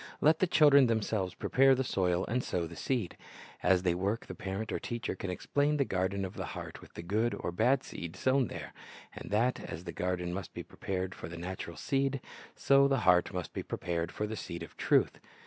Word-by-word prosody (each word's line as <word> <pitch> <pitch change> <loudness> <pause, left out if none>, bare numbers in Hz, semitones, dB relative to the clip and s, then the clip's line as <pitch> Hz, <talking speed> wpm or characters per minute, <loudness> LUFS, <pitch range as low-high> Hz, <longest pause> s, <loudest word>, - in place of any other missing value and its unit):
Let 155 +2 +4
the 185 - +3
children 145 -5 +6
themselves 110 -4 0
prepare 135 0 +4
the 130 - 0
soil 90 -6 +1
and 125 +3 -1
sow 85 -2 -1
the 85 +1 -9
seed. 120 -1 -2 0.5
As 90 0 +3
they 90 -2 +3
work, 100 +6 -1
the - - -7
parent 95 +3 -4
or - - -1
teacher 120 -2 -3
can 95 - -5
explain 145 +10 0
the 140 - +2
garden 95 0 -1
of 95 - -6
the - - -4
heart - - -7
with - - -16
the 85 - -6
good 110 +7 0
or - - -3
bad 130 +9 +2
seed 85 -1 -7
sown 130 -1 +2
there, - - -7 0.4
and - - -8
that 115 +5 +2
as 80 - -7
the 85 - -5
garden 90 0 -2
must 95 +1 -6
be - - -5
prepared 95 0 -4
for 80 - -8
the 85 - -7
natural 85 -1 -6
seed, 135 - 0 0.4
so 140 0 +5
the 135 -3 +1
heart 90 -2 +4
must 90 -2 -5
be - - -3
prepared 85 0 -3
for 105 - -2
the 110 +1 -4
seed - - -6
of - - -11
truth. - - +2
100 Hz, 215 wpm, -31 LUFS, 90-130 Hz, 0.5 s, children